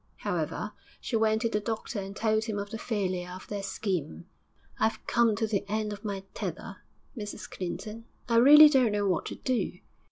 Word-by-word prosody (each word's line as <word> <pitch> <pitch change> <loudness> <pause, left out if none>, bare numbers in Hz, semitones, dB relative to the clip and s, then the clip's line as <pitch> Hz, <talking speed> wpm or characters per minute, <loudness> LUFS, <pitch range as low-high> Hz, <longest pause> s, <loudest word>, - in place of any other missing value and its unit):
However, - - -3 0.3
she 240 - -3
went 220 0 +2
to 230 - +2
the 210 - 0
doctor 220 0 -3
and 195 +1 -6
told 220 0 +1
him 215 -2 -3
of 200 0 -4
the 225 - -5
failure 185 -6 -2
of 185 +1 -9
their 205 -1 -3
scheme. 180 - -3 0.5
'I've 220 0 0
come 235 -3 +3
to 225 +2 0
the 210 -3 -1
end 215 0 -1
of 205 - -10
my 200 -2 -4
tether, - - -5 0.4
Mrs 210 -3 -6
Clinton; 215 +5 -6 0.2
I 230 -1 +3
really 295 +5 +10
don't 260 -7 +3
know 205 -1 +1
what 180 -3 0
to - - -5
do. 245 -8 -1
215 Hz, 190 wpm, -29 LUFS, 200-225 Hz, 0.5 s, really